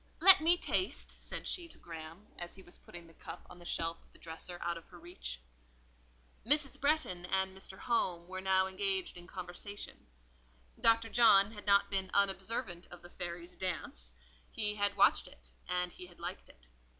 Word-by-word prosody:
"Let 375 -1 +10
me 340 +2 +5
taste," 370 - -1
said - - -7
she 350 -2 -3
to - - -13
Graham, 165 +3 -9
as 175 0 -7
he 190 - -13
was 175 - -11
putting 175 -1 -11
the 165 - -17
cup - - -10
on 180 - -12
the 175 - -13
shelf 165 0 -1
of - - -27
the - - -19
dresser 170 +2 -8
out 170 - 0
of 170 - -10
her 180 - -13
reach. 165 - -7 1.0
Mrs. 285 +2 +3
Bretton 280 - +1
and 190 0 0
Mr. 190 0 -8
Home 180 -7 0
were 185 0 -5
now 190 0 +3
engaged 190 0 0
in 175 0 -9
conversation. 185 - -6 0.7
Dr. 230 0 +4
John 215 -3 +6
had 210 -2 -11
not 200 0 +5
been 190 -1 0
unobservant 195 -1 +1
of 175 0 -12
the 175 - -12
fairy's 175 0 -6
dance; 150 - -3 0.4
he 210 0 +1
had 205 -1 0
watched - - +5
it, - - -13
and 180 0 0
he 180 - -8
had 175 - -18
liked 175 +2 -5
it. - - -17
185 Hz, 185 wpm, -34 LUFS, 175-205 Hz, 1.0 s, Let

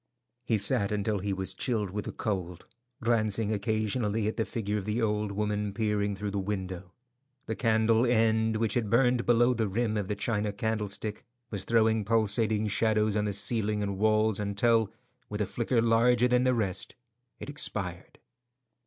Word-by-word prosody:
He 115 -2 +2
sat 100 0 +3
until 105 0 -1
he 100 +2 -3
was 95 0 -2
chilled 110 -7 -1
with 105 +1 -4
the - - -4
cold, 90 -5 -4 0.4
glancing 110 -2 +1
occasionally 110 +1 -1
at 110 - -2
the 110 - -1
figure 105 -3 -2
of 95 - -7
the 105 +2 -1
old 105 -2 0
woman 105 0 -2
peering 105 -2 0
through 105 +1 -4
the 100 - -2
window. 95 -2 -4 0.5
The 110 - -3
candle 115 0 +2
end, 110 -1 +2
which 110 -1 0
had 115 -4 -1
burned 125 +1 +2
below 120 +1 +4
the 110 -3 -1
rim 110 +2 -1
of 100 -3 -2
the 105 - -2
china 105 0 -1
candlestick, 105 0 -3 0.3
was 100 -3 -4
throwing 110 -1 +2
pulsating 110 0 +2
shadows 110 0 +1
on 105 0 +1
the 105 - -1
ceiling 105 0 0
and 100 -1 -3
walls, 110 -1 +2
until, 105 +2 +1 0.4
with 105 - -4
a 105 - +1
flicker 115 +2 0
larger 120 +2 +4
than 125 0 +2
the 130 -1 +3
rest, 100 -5 -2 0.4
it - - -7
expired. 100 -11 -2
110 Hz, 170 wpm, -29 LUFS, 100-115 Hz, 0.5 s, below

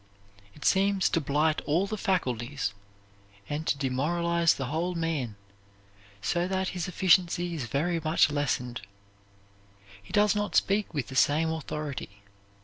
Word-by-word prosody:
It 150 - -9
seems 195 -1 +3
to 165 - +1
blight 150 +2 +1
all 165 +6 +2
the 215 +2 -3
faculties 135 - -1 0.7
and 150 +2 -4
to - - +1
demoralize 165 +5 +1
the 135 - -3
whole 165 +6 -2
man, 155 -10 -2 0.9
so 175 +1 0
that 190 0 -1
his 180 0 -4
efficiency 175 -1 +2
is 150 -7 -3
very 165 +8 0
much 155 -1 +3
lessened. 125 -5 -1 1.2
He 100 - -15
does 210 0 +3
not 205 0 -2
speak 205 +1 +2
with 145 -5 -3
the 130 - -8
same 155 +4 +3
authority. 145 -9 -5
160 Hz, 140 wpm, -28 LUFS, 140-180 Hz, 1.2 s, seems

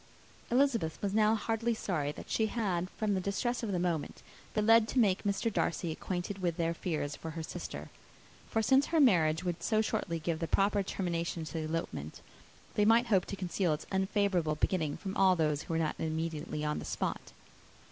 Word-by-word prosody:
Elizabeth 240 - +2
was 200 -1 -2
now 215 0 +4
most 220 - -1
heartily 230 +1 0
sorry 155 -9 -1
that - - -10
she 220 - +1
had, 185 -6 -1
from 215 0 -1
the 190 - 0
distress 225 +6 -1
of 225 -4 -2
the 185 - 0
moment, 175 -3 -2 0.3
been 210 -1 +2
led 225 0 +6
to 260 - -4
make 200 -6 +4
Mr. 205 +2 0
Darcy 170 -2 0
acquainted 180 +4 -4
with 175 -3 -1
their 165 0 +1
fears 155 -4 -3
for 165 - -7
her 160 0 -5
sister; - - -6 0.6
for 225 - +1
since 270 +5 +4
her 325 - +2
marriage 170 - +4
would 175 -2 -2
so 215 +4 +1
shortly 215 -6 -1
give 160 0 -2
the 165 - -2
proper 200 +3 +2
termination 170 -3 -2
to 155 - -8
the 160 -1 -2
elopement, 155 - -4 0.5
they 210 - +2
might 230 +3 +5
hope 185 -2 +4
to - - -5
conceal 180 -2 0
its 150 - -5
unfavourable 190 -4 +1
beginning 155 -2 0
from 195 -1 -5
all 190 -1 +5
those 150 -3 +1
who - - -5
were - - +2
not 160 -2 0
immediately 160 -1 -3
on 150 0 -1
the - - -7
spot. - - -3
185 Hz, 200 wpm, -32 LUFS, 160-215 Hz, 0.6 s, led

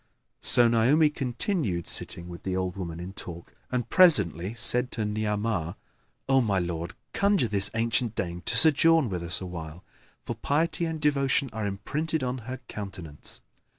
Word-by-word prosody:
"[FN#8] - - -14
So 120 -1 +7
Naomi 130 +7 +3
continued 125 - -2
sitting 85 0 -1
with 85 -1 -9
the 95 -1 -3
old 95 0 -2
woman 85 -4 -6
in 90 +2 -7
talk 85 -3 -9 0.2
and 125 -2 -2
presently 105 - +4
said 125 +2 +4
to 110 - -2
Ni'amah, 105 -4 -2 0.5
"O 135 0 +4
my 105 -5 0
lord, 85 -2 -4 0.2
conjure 200 - +2
this 100 -2 +3
ancient 115 0 0
dame 85 -3 -4
to - - +2
sojourn 160 -2 +5
with 90 -3 -4
us 85 +2 0
awhile, 85 -1 -8 0.4
for - - -3
piety 165 +4 0
and 160 -1 -4
devotion 140 -2 +1
are 110 -2 -3
imprinted 150 +10 -3
on 125 0 -3
her 130 - -5
countenance." 95 -7 -8
110 Hz, 160 wpm, -26 LUFS, 90-135 Hz, 0.5 s, So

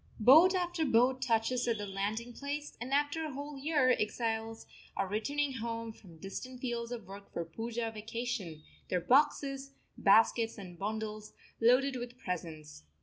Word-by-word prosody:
Boat 315 - +8
after 350 -2 0
boat 255 -1 +3
touches 240 0 +1
at 230 -2 +1
the 205 - -4
landing 210 +5 -3
place, 290 +3 -5
and 250 +2 -5
after 290 +3 +1
a 305 -3 -4
whole 285 +2 -6
year 285 -3 +3
exiles 225 +1 -2 0.3
are 195 - 0
returning 275 +8 -1
home 230 -2 -4
from 175 -7 -16
distant 245 +9 -7
fields 240 -2 -3
of 235 -4 -5
work 200 +2 -11
for 170 - -3
the 165 - -17
Poojah 230 +3 -3
vacation, 215 -7 -4 0.3
their 180 - +1
boxes, 275 - +2 0.3
baskets, 225 +3 +4
and 180 -4 -10
bundles 215 +1 -4 0.3
loaded 255 +3 +4
with 245 0 -7
presents. 160 - -6
235 Hz, 155 wpm, -32 LUFS, 210-270 Hz, 0.3 s, Boat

